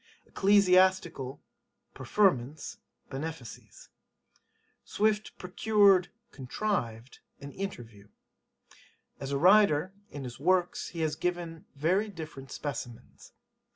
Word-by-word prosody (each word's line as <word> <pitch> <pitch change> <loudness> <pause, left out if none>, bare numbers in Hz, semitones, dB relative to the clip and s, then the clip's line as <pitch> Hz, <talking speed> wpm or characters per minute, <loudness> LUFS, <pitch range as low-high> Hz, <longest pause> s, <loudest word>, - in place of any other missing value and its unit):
Ecclesiastical 185 -8 +3 0.5
[preferments] 145 - 0 0.3
benefices. 140 -3 -8 0.9
'Swift 215 0 -1
[procured] 195 0 +3 0.2
contrived 130 - -3 0.2
an 140 0 -9
interview. 115 - -7 1.1
[As 135 0 -5
a 140 - +1
writer] 185 -1 +4 0.2
In 145 - -7
his 120 -1 -8
works 180 +3 +1
he 170 - -6
has 155 -1 0
given 175 -2 -4
very 185 +9 +1
different 155 -7 -9
specimens. 125 -5 -7
165 Hz, 85 wpm, -29 LUFS, 135-190 Hz, 1.1 s, writer